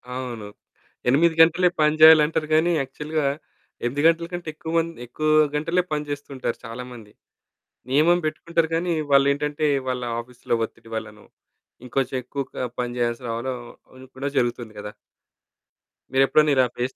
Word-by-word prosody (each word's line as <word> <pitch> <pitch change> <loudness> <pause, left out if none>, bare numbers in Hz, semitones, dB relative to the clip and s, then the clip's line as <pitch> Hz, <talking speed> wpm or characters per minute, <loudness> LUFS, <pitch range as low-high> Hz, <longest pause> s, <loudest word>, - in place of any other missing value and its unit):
అవును. 120 -5 -5 0.6
8 160 +5 +3
గంటలే 170 +2 +5
పని 150 0 +3
జేయాలంటారు. 155 -1 +7
గానీ 170 +2 +3
యాక్చువల్‌గా 150 +3 -3 0.6
8 130 +4 -1
గంటల 165 0 +2
కంటే 175 -2 -6
ఎక్కువ 160 +1 -7
మంది 165 0 -1
ఎక్కువ 155 +6 -3 0.3
గంటలే 165 +4 +1
పనిజేస్తూ 145 -1 -4
ఉంటారు 125 -2 -3
చాలామంది. 115 -2 -9 0.8
నియమం 160 +6 +4
పెట్టుకుంటారు 160 +1 -1
కానీ, 170 +1 0 0.2
వాళ్ళేంటంటే 145 +2 +2 0.2
వాళ్ళ 125 -1 -2 0.2
ఆఫీస్‌లో 120 0 -4
ఒత్తిడి 115 - -17
వల్లనో, 105 -1 -7 0.6
ఇంకొంచెం 130 +1 -2
ఎక్కువగా 135 0 -5 0.2
పని 120 0 -2
జేయాల్సి 120 +1 -1
రావడం 120 +3 -3 0.4
అది 130 0 -13
కూడా 140 +2 -2
జరుగుతుంది 120 -2 -1
గదా! 105 0 -7 1.2
మీరెప్పుడైనా 145 +3 +4
ఇలా 130 - +4
ఫేస్ 125 +2 -2
140 Hz, 130 wpm, -23 LUFS, 125-160 Hz, 1.2 s, జేయాలంటారు